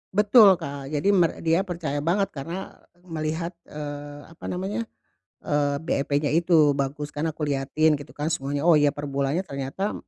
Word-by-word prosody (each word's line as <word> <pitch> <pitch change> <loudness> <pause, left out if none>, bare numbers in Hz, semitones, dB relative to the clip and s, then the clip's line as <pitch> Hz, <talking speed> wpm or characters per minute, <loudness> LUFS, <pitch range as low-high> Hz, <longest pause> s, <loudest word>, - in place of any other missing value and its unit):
Betul 205 -1 +7
Kak, 140 -5 -7
jadi 150 +6 0
mer 175 -5 +2
dia 170 +4 +2
percaya 160 -5 -3
banget, 190 +6 0
karena, 165 +7 -7 0.2
melihat, 165 0 -3 0.2
eee, 145 -1 -7
apa 165 - -12
namanya, 195 +5 -3 0.6
eee, 145 -1 +1
BEP-nya 145 -2 0
itu, 160 -3 +4
bagus 140 +2 -3
kan, 150 +2 -2
aku 155 - -9
liatin 145 +2 +1
gitu 145 0 -11
kan 150 +2 -2
semuanya. 140 0 -2
Oh 175 - +7
ya, 145 -1 +4
per 145 0 -6
bulannya 140 +4 0
ternyata 140 +7 -3
150 Hz, 160 wpm, -25 LUFS, 145-175 Hz, 0.6 s, Betul